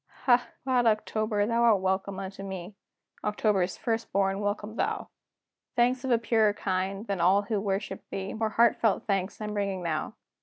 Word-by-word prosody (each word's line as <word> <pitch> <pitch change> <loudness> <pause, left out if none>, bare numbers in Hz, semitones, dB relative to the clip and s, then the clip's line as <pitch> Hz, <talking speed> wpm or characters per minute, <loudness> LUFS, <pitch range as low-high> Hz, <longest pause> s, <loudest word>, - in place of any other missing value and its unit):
Ha! 245 -1 +4 0.2
glad 250 -2 +2
October, 215 -1 +1
thou 230 +2 +1
art 225 -4 +5
welcome 190 +1 -1
unto 195 0 -6
me! 190 0 -6 0.5
October's 205 -3 +1
first 230 -1 -2
born, 195 0 +1
welcome 205 +1 -3
thou! 435 - -2 0.7
Thanks 250 +2 +2
of 265 - -2
a 240 - +5
purer 225 -2 +2
kind, 195 +1 -2
than 200 -5 -2
all 190 +4 +4
who 210 -1 -1
worship 195 -1 -2
thee, 195 0 -4
More 220 0 -1
heartfelt 225 -1 +3
thanks 195 -1 -1
I'm 210 -1 -4
bringing 200 -3 -2
now! 165 +6 -2
205 Hz, 165 wpm, -28 LUFS, 195-225 Hz, 0.7 s, art